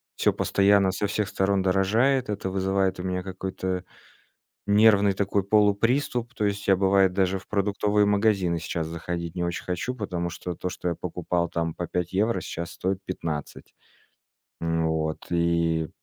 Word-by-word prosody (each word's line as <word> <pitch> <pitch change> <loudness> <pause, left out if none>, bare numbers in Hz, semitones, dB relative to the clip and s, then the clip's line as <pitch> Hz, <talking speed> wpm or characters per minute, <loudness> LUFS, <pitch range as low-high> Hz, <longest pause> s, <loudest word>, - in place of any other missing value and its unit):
всё - - +2
постоянно 100 -1 +3
со 105 +2 -1
всех 100 0 -1
сторон 95 0 +1
дорожает, 110 +7 +2
это 95 -2 -2
вызывает 95 0 0
у - - -4
меня 90 0 -2
какой-то 95 -1 -4 0.8
нервный 105 -1 +5
такой 100 0 0
полуприступ. 115 +5 +2
То 105 - 0
есть 100 0 -2
я, 95 - +6
бывает, 95 -1 +3
даже 95 0 +1
в - - -19
продуктовые 105 0 +1
магазины 100 -4 +2
сейчас 80 0 -3
заходить 85 0 -5
не 90 - -1
очень 85 0 -3
хочу, 90 +8 -3
потому 90 -6 -3
что 90 +1 -5
то, 90 - -4
что 90 -1 -3
я 85 - -2
покупал 85 +1 -2
там 85 -1 -2
по 85 - -5
5 90 0 -3
евро, 110 +5 +1
щас 85 0 -5
стоит 95 0 -2
15. 80 -6 -5 0.9
Н, 80 -1 0
вот 80 -1 -2
и 85 -2 +1
95 Hz, 160 wpm, -26 LUFS, 85-100 Hz, 0.9 s, я